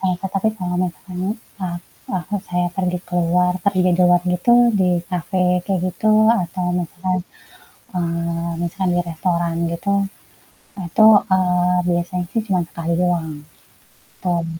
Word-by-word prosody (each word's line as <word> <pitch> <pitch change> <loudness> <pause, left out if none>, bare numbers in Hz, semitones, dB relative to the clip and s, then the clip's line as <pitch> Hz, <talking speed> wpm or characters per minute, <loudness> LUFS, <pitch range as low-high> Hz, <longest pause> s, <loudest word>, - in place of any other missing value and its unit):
sama 185 -1 +1
so 195 - -2
tapi 195 +3 +2
kalau 180 -1 -3
misalkan, 180 +1 -5 0.4
eee, 175 -1 -2 0.4
waktu 185 +3 -2
saya 180 0 0
pergi 180 -2 0
keluar, 180 0 +2
pergi 195 -2 +2
di 180 - +3
luar 180 -1 +5
gitu, 180 +7 +2 0.3
di 180 - +3 0.2
kafe 180 +1 -1 0.2
kayak 190 -3 -1
gitu, 185 +5 0 0.3
atau 180 +1 -4 0.2
misalkan, 185 +2 -2 0.8
eee, 170 0 -2
misalkan 185 +2 -2
di - - +2
restoran 170 0 -1 0.2
gitu, 185 +4 -2 1.0
itu, 215 +6 +4 0.3
eee, 180 -1 +2
biasanya 175 +1 -1
sih, 225 - 0
cuman 185 -3 +1
sekali 170 0 -3
doang. 175 -3 0 0.9
Tap 175 -2 0
180 Hz, 135 wpm, -20 LUFS, 170-185 Hz, 1.0 s, luar